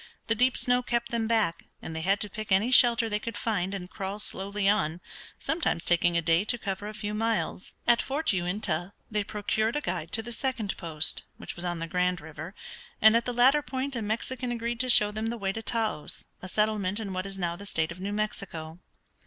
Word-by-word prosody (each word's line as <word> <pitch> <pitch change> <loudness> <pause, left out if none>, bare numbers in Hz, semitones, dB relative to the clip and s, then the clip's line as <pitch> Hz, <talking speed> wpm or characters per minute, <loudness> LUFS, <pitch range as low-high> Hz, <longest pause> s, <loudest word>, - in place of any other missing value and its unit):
The 225 - +2
deep 250 +3 +3
snow 245 0 +3
kept 235 -1 -1
them 230 -1 0
back, 220 -7 +1
and 160 - -7
they 160 - -3
had 195 +4 +2
to 210 - -1
pick 215 0 -6
any 205 +6 +4
shelter 240 -2 +7
they 210 -1 -1
could 230 -1 -5
find, 200 -4 -1
and 180 -2 -6
crawl 195 +1 -5
slowly 200 -1 -1
on, 185 -5 +2 0.4
sometimes 315 - -1
taking 175 0 +3
a 170 - +1
day 165 +3 +3
to 240 +3 +1
cover 200 -2 -4
a 215 - -6
few 210 0 -4
miles. 220 -3 -1
At 240 - +5
Fort 285 -2 0
Uintah 180 0 -1 0.2
they 210 -1 +1
procured 215 +3 -1
a - - +2
guide 175 - -3
to 225 - +1
the 240 - -7
second 235 -4 -2
post, 160 -3 +1
which - - -7
was 175 - -5
on 175 -1 -1
the 165 - -3
Grand 180 0 +1
River, 160 +4 -8 0.4
and 220 +1 +7
at 230 - +3
the 245 - -1
latter 260 +5 +5
point 265 +1 -3
a 235 - -2
Mexican 240 +4 -2
agreed 235 0 -2
to 255 +1 +1
show 210 -3 +6
them 215 +1 -3
the 235 +1 -2
way 195 -3 -1
to 225 - -4
Taos, 220 -8 -1 0.2
a 185 - -6
settlement 210 0 +1
in 200 -3 -4
what 185 +1 -3
is 195 0 -6
now 170 -2 -1
the 200 +3 -8
state 160 -4 0
of 170 - -8
New 195 +2 -3
Mexico. 185 -6 -4
210 Hz, 225 wpm, -28 LUFS, 180-230 Hz, 0.4 s, shelter